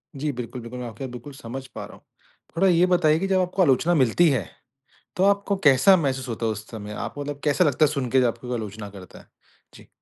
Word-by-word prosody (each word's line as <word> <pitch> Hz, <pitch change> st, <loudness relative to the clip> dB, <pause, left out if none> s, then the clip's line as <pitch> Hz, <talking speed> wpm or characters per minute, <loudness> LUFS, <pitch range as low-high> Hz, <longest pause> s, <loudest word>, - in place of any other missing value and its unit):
जी। 145 Hz, +2 st, -2 dB
बिल्कुल, 125 Hz, -1 st, -7 dB
बिल्कुल 115 Hz, +2 st, -8 dB
मैं 125 Hz, -, -5 dB
आपकी 115 Hz, +3 st, -9 dB
बात 130 Hz, -, -5 dB
बिल्कुल 125 Hz, +4 st, -9 dB
समझ 130 Hz, 0 st, -8 dB
पा -, -, -8 dB
रहा -, -, -13 dB
हूँ। -, -, -25 dB, 0.5 s
थोड़ा 190 Hz, +3 st, +3 dB
ये 175 Hz, -1 st, +4 dB
बताइए 170 Hz, -4 st, +3 dB
कि 195 Hz, -, -1 dB
जब 190 Hz, -1 st, +2 dB
आपको 185 Hz, +1 st, -1 dB
आलोचना 160 Hz, +2 st, +3 dB
मिलती 150 Hz, +5 st, +4 dB
है, 120 Hz, -, -1 dB, 0.7 s
तो 185 Hz, -, +1 dB
आपको 200 Hz, 0 st, +2 dB
कैसा 145 Hz, +6 st, +6 dB
महसूस 135 Hz, -5 st, -2 dB
होता 115 Hz, 0 st, -3 dB
है 110 Hz, -, +1 dB
उस 105 Hz, 0 st, -7 dB
समय 105 Hz, -2 st, -7 dB
आपको 115 Hz, +6 st, -6 dB
मतलब 145 Hz, 0 st, -5 dB
कैसा 150 Hz, +4 st, +3 dB
लगता 150 Hz, -1 st, +3 dB
है 150 Hz, -, 0 dB
सुनके 135 Hz, -3 st, +1 dB
जब 125 Hz, -, +3 dB
आपको 125 Hz, +2 st, -4 dB
आलोचना 105 Hz, -2 st, -5 dB
करता 95 Hz, -2 st, -13 dB
है? -, -, -20 dB, 0.5 s
जी। -, -, -16 dB
135 Hz, 240 wpm, -24 LUFS, 115-165 Hz, 0.7 s, कैसा